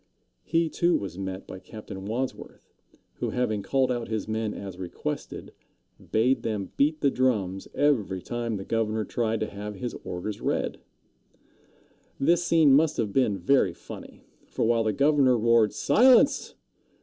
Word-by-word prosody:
He, 165 +1 +1
too, 170 +2 +2
was 95 -2 -6
met 95 0 -5
by 95 - -9
Captain 100 -2 -9
Wadsworth, 125 +4 -5 0.4
who, - - -2
having 110 -5 -1
called 130 +6 +1
out 120 -2 -2
his 110 -2 -3
men 110 -1 -2
as 95 -3 -8
requested, 90 -2 -5 0.6
bade 120 +3 +2
them 105 -4 -3
beat 155 +2 +1
the 140 - +3
drums 105 -8 0
every 115 -10 +1
time 120 +4 -3
the 95 -1 -6
governor 110 -1 -1
tried 115 -2 -1
to 110 - -2
have 105 +1 -6
his 120 +5 -5
orders 95 +4 -5
read. - - -1 1.4
This 170 +5 +3
scene 160 -5 +5
must 150 +2 +3
have 105 -4 -1
been 110 -7 +2
very 95 -2 +2
funny; - - -11 0.2
for - - -1
while 115 0 +2
the 110 - +2
governor 140 +1 +3
roared, 115 -2 +4
"Silence!" 260 +4 +4
115 Hz, 150 wpm, -26 LUFS, 100-135 Hz, 1.4 s, scene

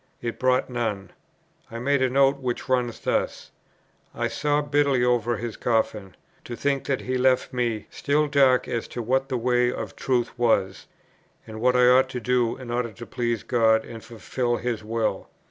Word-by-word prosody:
It 115 -1 -5
brought 130 0 +2
none. 110 -7 -3 0.6
I 115 - -7
made 140 +3 +1
a 130 - +2
note, 135 +1 +3
which 125 -3 -3
runs 125 -3 0
thus: - - -2 0.6
"I - - -1
sobbed 145 0 -1
bitterly 140 -4 +3
over 120 -2 +1
his 115 0 -5
coffin, 110 -5 -1 0.3
to 120 - -7
think 140 +1 -1
that 135 -2 -1
he 130 0 -2
left 130 0 +2
me 120 -4 -1
still 150 +1 +1
dark 135 -3 +3
as 115 - -3
to 120 - -5
what 135 +4 0
the 130 - -1
way 125 +1 +2
of - - -6
truth 125 -3 -1
was, 95 -6 +1 0.6
and 110 0 -9
what 125 +1 +3
I 125 0 +5
ought 130 +1 +5
to 125 - -4
do 125 -1 0
in 130 -2 -8
order 120 -1 -1
to 120 - -10
please 120 -2 -2
God 110 -2 +2
and 115 -2 -10
fulfil 120 +1 -2
His 120 -3 -3
will." 115 +1 -2
125 Hz, 180 wpm, -24 LUFS, 115-130 Hz, 0.6 s, I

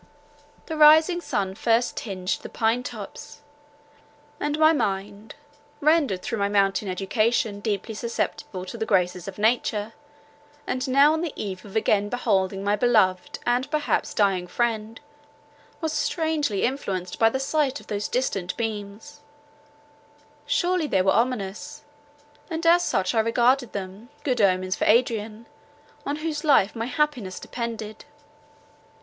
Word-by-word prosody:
The 320 - -5
rising 315 +4 +6
sun 195 - -2
first 230 +4 +1
tinged 185 -4 -3
the - - -8
pine 225 +2 +1
tops; - - -9 1.0
and 295 0 -1
my 315 +1 +5
mind, 205 -4 -3 0.4
rendered 290 - +2
through 225 - -3
my 200 0 +1
mountain 200 0 +1
education 205 +3 0
deeply 210 +1 -3
susceptible 215 -4 -4
of 185 - -7
the 225 -1 -4
graces 180 -2 +1
of 195 - -7
nature, 220 -1 0 0.7
and 255 +2 -2
now 280 +4 +5
on 320 - -1
the 340 -4 -3
eve 190 -3 -5
of 200 - -12
again 205 -2 +2
beholding 195 -5 0
my 205 +1 +2
beloved 210 -6 +2
and 245 +3 +1
perhaps 300 -1 -1
dying 195 -4 +1
friend, 225 0 -2 0.8
was 320 -1 -2
strangely 310 - 0
influenced 190 -9 -2
by 225 - +5
the 265 - -2
sight 275 0 0
of - - -16
those 205 0 -3
distant 195 -8 -2
beams: 215 +3 -5 1.3
surely 355 -3 +1
they 190 -8 +2
were 190 - +3
ominous, 220 -5 -2 0.7
and 330 0 -4
as 345 +1 +5
such 185 - 0
I 225 - +2
regarded 240 +2 +2
them, 200 +4 -7
good 250 -5 0
omens 185 -1 +2
for - - -1
Adrian, 225 -1 +1 0.6
on 285 - -1
whose 305 -1 -4
life 275 -10 +4
my 225 0 -3
happiness 255 -9 -1
depended. 225 -3 -6
225 Hz, 140 wpm, -24 LUFS, 200-270 Hz, 1.3 s, rising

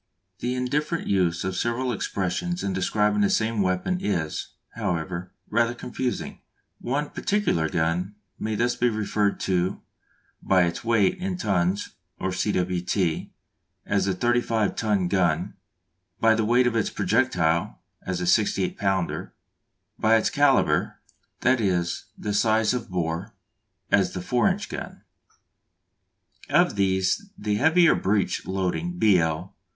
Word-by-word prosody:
The 125 +1 -2
indifferent 150 +6 -1
use 90 -4 +1
of 95 0 -2
several 120 +5 -1
expressions 110 - -2
in 100 - -1
describing 105 +2 +1
the 100 - +3
same 110 -1 +1
weapon 95 - 0
is, 85 -6 -2 0.3
however, 90 -3 -3 0.2
rather 120 +2 +1
confusing. 125 +1 -4 0.4
One 145 +4 -2
particular 200 - 0
gun 85 +5 -1 0.2
may 110 - -2
be 110 - 0
thus 120 0 -1
referred 105 -3 +1
to: 95 +1 0 0.6
by 95 -2 +3
its 85 +4 -2
weight 115 - +2
in 185 0 -3
tons 95 - 0 0.3
or 95 - -1
cwt., 90 -2 -1 0.6
as 100 -2 +1
"the 95 - 0
35 115 -1 +1
ton 105 -5 +1
gun"; 90 -4 +1 0.7
by 115 0 +5
the 110 -1 +1
weight 120 +3 +4
of 120 -1 +1
its 110 - +1
projectile, 85 -1 +1 0.2
as 90 -1 -3
"a 90 - -2
68 95 0 +1
pounder"; 95 -3 -1 0.6
by 110 +1 +4
its 110 - +2
calibre, 145 -1 +3 0.5
that 130 -1 +3
is, 90 -4 0 0.3
size 110 +2 +2
of 125 -2 -4
bore, 90 +3 -3 0.6
as 100 -2 +3
"the 90 - -4
4 120 +1 +2
inch - - -2
gun." - - -7 1.5
Of - - +3
these 95 - +1
the 105 0 -1
heavier 160 +6 +5
breech 100 0 0
loading 95 - -2
(B. 105 - +5
L.) 80 +3 -2
100 Hz, 135 wpm, -25 LUFS, 90-120 Hz, 1.5 s, by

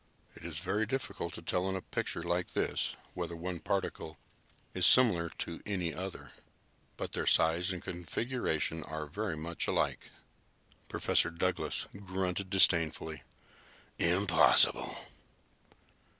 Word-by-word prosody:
"It - - -13
is - - -6
very 105 +2 -1
difficult 100 -9 -3
to - - -9
tell 90 +3 0
in 95 - -2
a 95 - -3
picture 85 - -3
like 85 +1 -1
this - - -1 0.2
whether 85 - -4
one 85 +1 -4
particle 80 0 -3 0.6
is 95 -1 +5
similar 90 -10 +6
to 85 - -5
any 90 -6 -2
other, 95 +3 -6 0.7
but - - -4
their - - -2
size 85 +4 +4
and 90 -2 -5
configuration 90 -2 -2
are 80 -1 -5
very 90 +2 -3
much 85 +2 -2
alike." - - -1 0.8
Professor - - +2
Douglas 90 +2 -1
grunted 95 -1 -3
disdainfully. 80 -4 +2 0.8
"Impossible!" 90 +1 +5
90 Hz, 120 wpm, -32 LUFS, 85-95 Hz, 0.8 s, similar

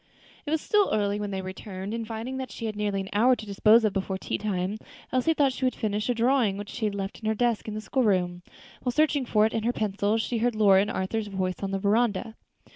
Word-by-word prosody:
It - - -1
was 315 0 +1
still 415 -2 +2
early 205 -1 +1
when 205 -1 -3
they 190 -1 -3
returned; 190 +1 -6
and 230 -1 -4
finding 230 +4 -5
that 260 -1 -4
she 230 - -7
had 215 -1 -3
nearly 205 -2 -1
an 190 - -7
hour 245 +5 +5
to 220 - -9
dispose 215 +3 +4
of 210 - +1
before 190 -1 -2
tea - - -3
time, 200 0 -2 0.3
Elsie 255 +6 +2
thought 275 -3 +3
she 260 - -6
would 255 - +1
finish 215 0 -2
a 245 - +2
drawing 235 -4 +2
which 205 0 -7
she 220 - -3
had 205 -1 -1
left 195 0 -4
in 220 - -5
her 220 - +1
desk 235 -1 0
in 215 - -4
the 215 - -4
school 260 +4 -1
room. 180 -5 +1 0.4
While 250 - -1
searching 295 -3 +2
for 215 -1 +4
it 220 - -1
and 225 - -1
her 235 - +2
pencil, 210 -1 0
she 225 +1 -1
heard 240 0 +1
Lora's 200 -3 +5
and 205 - -1
Arthur's 210 +3 -2
voices 185 -2 -3
on 195 - -2
the 195 - -1
veranda. 215 +2 +1
215 Hz, 260 wpm, -27 LUFS, 200-240 Hz, 0.4 s, hour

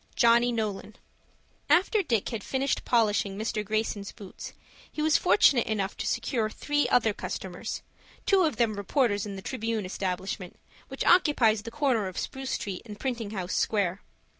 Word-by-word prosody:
JOHNNY 235 +1 +5
NOLAN 215 -2 -3 0.7
After 395 +4 +4
Dick 230 - 0
had 225 -4 -4
finished 270 +1 -1
polishing 210 -4 +2
Mr. 215 0 -2
Greyson's 215 -1 -2
boots 200 -4 -10 0.4
he - - -9
was 305 0 +3
fortunate 220 +6 +4
enough 200 -3 -1
to - - -3
secure 230 -5 0
three 290 +6 0
other 225 -3 +3
customers, 190 +2 -5 0.4
two 390 -1 +4
of 315 -7 +2
them 225 -1 +1
reporters 205 -1 +1
in 200 - -6
the 190 - -8
Tribune 225 -4 -2
establishment, 185 0 -4 0.3
which 270 - -4
occupies 265 - +4
the 225 - -7
corner 240 -5 +1
of 185 - -8
Spruce 265 0 -4
Street 195 -3 -3
and 210 -3 -10
Printing 240 -5 -3
House 190 -4 -4
Square. 195 -3 0
220 Hz, 160 wpm, -28 LUFS, 200-255 Hz, 0.7 s, JOHNNY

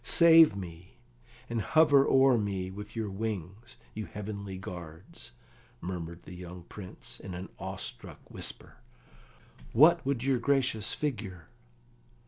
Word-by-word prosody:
"Save 165 - +7
me, 90 -2 -9 0.5
and 115 -1 -2
hover 145 - +5
o'er 135 -1 +5
me 100 -4 -2
with 105 +3 -9
your 110 -3 -3
wings, 105 +3 -5 0.2
you 110 0 -5
heavenly 100 -2 -6
guards!" 85 -6 -9 0.5
murmured 85 0 -6
the - - -10
young 90 0 -9
Prince, 95 +1 -10
in 95 -2 -7
an 90 +2 -7
awestruck 95 -1 -6
whisper. - - -4 1.0
"What 160 +7 +6
would 135 -3 -1
your 135 -2 +2
gracious 120 -5 +1
figure?" 100 - -4
100 Hz, 120 wpm, -30 LUFS, 90-130 Hz, 1.0 s, Save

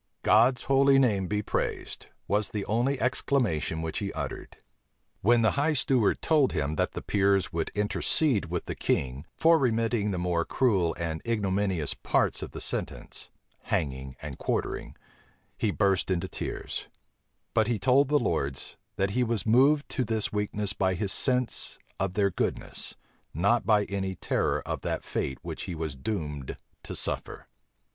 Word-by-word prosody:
"God's 120 +4 +4
holy 135 0 +5
name 105 -8 +3
be 105 +2 -1
praised," - - -3 0.2
was 105 +1 +1
the 105 -2 -3
only 125 +5 +1
exclamation 105 - 0
which 80 - -3
he 100 -1 -3
uttered. 75 -4 -6 0.6
When 115 +3 +4
the 110 - +4
high 145 +3 +1
steward 130 -5 +2
told 150 -5 +3
him, 75 -2 -1
that - - 0
the - - -5
peers 100 -2 +2
would 80 -1 -1
intercede 105 +3 +2
with 85 0 -3
the - - -3
king 65 +3 -1
for 165 0 +5
remitting 115 -4 +1
the 95 - -2
more 90 -1 0
cruel 95 -10 +1
and 80 -2 -3
ignominious 100 -7 0
parts - - 0
of - - -5
the - - -8
sentence, - - -3 0.4
hanging 65 -2 -2
and - - -6
quartering, - - -2 0.6
he 110 - 0
burst 100 -3 +1
into 95 0 0
tears; - - -5 0.7
but 110 -1 +3
he 120 -2 +1
told 130 +7 +4
the 150 - +4
lords, 70 - -2 0.2
that 95 0 0
he 125 +4 +1
was 115 -4 -1
moved 135 +6 +4
to 130 - -1
this 110 -2 0
weakness 105 -1 -1
by 95 -1 +1
his 95 +2 0
sense 125 -3 0 0.2
of 95 -1 -1
their 100 -2 +2
goodness, - - -3 0.4
not 100 +8 +2
by 105 -2 +5
any 95 -2 -3
terror - - 0
of - - -3
that - - -2
fate 65 - -2
which - - -5
he 90 -3 -5
was 80 -3 -4
doomed 75 -4 -4 0.2
to - - -7
suffer. - - -4
105 Hz, 160 wpm, -28 LUFS, 90-120 Hz, 0.7 s, holy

